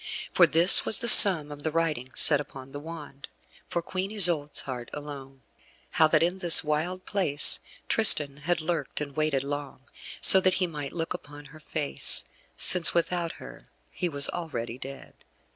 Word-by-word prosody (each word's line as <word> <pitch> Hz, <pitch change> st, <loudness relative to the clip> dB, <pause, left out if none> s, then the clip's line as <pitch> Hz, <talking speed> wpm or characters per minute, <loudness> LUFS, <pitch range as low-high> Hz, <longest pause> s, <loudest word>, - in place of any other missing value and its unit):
For -, -, +2 dB
this 170 Hz, +4 st, +4 dB
was -, -, 0 dB
the 240 Hz, -, -5 dB
sum 170 Hz, -10 st, +9 dB
of 145 Hz, 0 st, -13 dB
the 155 Hz, -, -5 dB
writing 155 Hz, -5 st, -5 dB
set 145 Hz, -2 st, +3 dB
upon 135 Hz, -2 st, -15 dB
the 145 Hz, -, -10 dB
wand, 150 Hz, -3 st, -13 dB, 0.4 s
for 170 Hz, -, -6 dB
Queen 185 Hz, +3 st, -7 dB
Isoude's 175 Hz, -8 st, -4 dB
heart 125 Hz, -3 st, -10 dB
alone: 135 Hz, -3 st, -13 dB, 0.5 s
how 160 Hz, -, +1 dB
that 155 Hz, -, -1 dB
in 180 Hz, +3 st, -4 dB
this 175 Hz, -3 st, +5 dB
wild 165 Hz, +5 st, -6 dB
place 165 Hz, -8 st, 0 dB, 0.3 s
Tristan 150 Hz, -10 st, +2 dB
had 165 Hz, +3 st, -5 dB
lurked 155 Hz, -3 st, -6 dB
and 145 Hz, -2 st, -10 dB
waited 155 Hz, -3 st, -4 dB
long, 145 Hz, -1 st, -9 dB, 0.4 s
so 190 Hz, -, +6 dB
that 185 Hz, 0 st, +1 dB
he 185 Hz, -, -3 dB
might 150 Hz, -5 st, -10 dB
look 165 Hz, -1 st, -6 dB
upon 145 Hz, 0 st, -14 dB
her 155 Hz, -, -16 dB
face, 150 Hz, -1 st, +1 dB, 0.3 s
since 180 Hz, -2 st, +2 dB
without 170 Hz, 0 st, -4 dB
her -, -, -16 dB, 0.2 s
he 180 Hz, -, -6 dB
was 140 Hz, -2 st, +3 dB
already 125 Hz, -8 st, -9 dB
dead. 135 Hz, +1 st, -13 dB
155 Hz, 170 wpm, -23 LUFS, 140-175 Hz, 0.5 s, sum